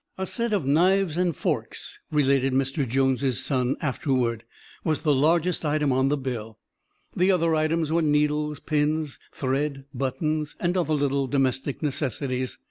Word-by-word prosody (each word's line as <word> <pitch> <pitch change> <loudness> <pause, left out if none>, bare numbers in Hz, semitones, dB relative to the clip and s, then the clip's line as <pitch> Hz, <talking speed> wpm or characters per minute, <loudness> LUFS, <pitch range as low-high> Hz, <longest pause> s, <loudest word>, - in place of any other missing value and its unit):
"A 190 - -2
set 235 +3 -2
of 195 -9 0
knives 175 +4 +3
and 175 -2 +1
forks," - - -3
related 135 -3 +2
Mr. 135 0 0
Jones' 130 0 +1
son 130 -2 0
afterward, 125 -5 0 0.4
"was 155 -3 -1
the 150 -3 +3
largest 165 +6 +2
item 150 -2 +1
on 130 +1 +2
the 145 - +1
bill. 115 -5 -5 0.6
The 185 +2 +3
other 170 -3 +3
items 155 0 +1
were 170 +1 +2
needles, 150 -1 +1
pins, 150 -1 -1
thread, 135 +1 -2
buttons, 150 +4 -2
and 175 +1 0
other 160 -4 +1
little 140 -1 0
domestic 135 +2 -1
necessities. 130 -3 -2
145 Hz, 145 wpm, -25 LUFS, 135-160 Hz, 0.6 s, knives